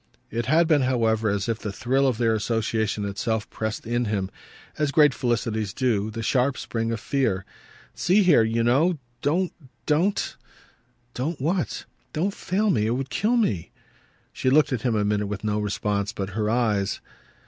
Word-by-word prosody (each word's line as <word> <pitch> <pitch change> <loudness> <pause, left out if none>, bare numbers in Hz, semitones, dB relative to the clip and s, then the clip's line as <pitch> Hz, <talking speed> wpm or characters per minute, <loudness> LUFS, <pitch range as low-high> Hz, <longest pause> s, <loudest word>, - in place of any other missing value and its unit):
It 115 +1 -2
had 160 +4 +4
been, 155 -3 +4
however, 115 -4 +1
as 100 0 -1
if 115 -1 -1
the 105 - -4
thrill 135 +6 +1
of 125 -4 +1
their 115 -2 +2
association 110 -1 -1
itself 110 +2 -2
pressed 110 -1 -4
in 120 +1 0
him, 100 -3 -2 0.5
as 150 -1 +2
great 150 -3 +5
felicities 110 -4 -1
do, 110 -5 +1
the 115 +1 -5
sharp 130 +3 +1
spring 115 0 -2
of 115 - -2
fear. 105 -6 0 0.5
"See 195 +4 +3
here, 170 -10 +6
you 115 +1 +1
know: 150 +9 +3 0.2
don't, 175 +6 +1 0.3
DON'T 170 +7 +1 0.4
!" 120 0 -40
"Don't 150 +6 -3
what?" 165 - -1 0.3
"Don't 185 +6 0
fail 200 +3 0
me. 110 -10 +1
It 115 - +1
would 135 +1 -4
kill 225 - +1
me." 100 - 0 0.6
She 130 - 0
looked 145 +1 +4
at 120 - -1
him 120 -2 0
a 105 -1 +1
minute 105 0 0
with 100 0 -5
no 105 0 0
response 105 0 -1
but 95 -3 -4
her 105 +1 -1
eyes. 110 -4 +1
115 Hz, 180 wpm, -25 LUFS, 105-140 Hz, 0.6 s, here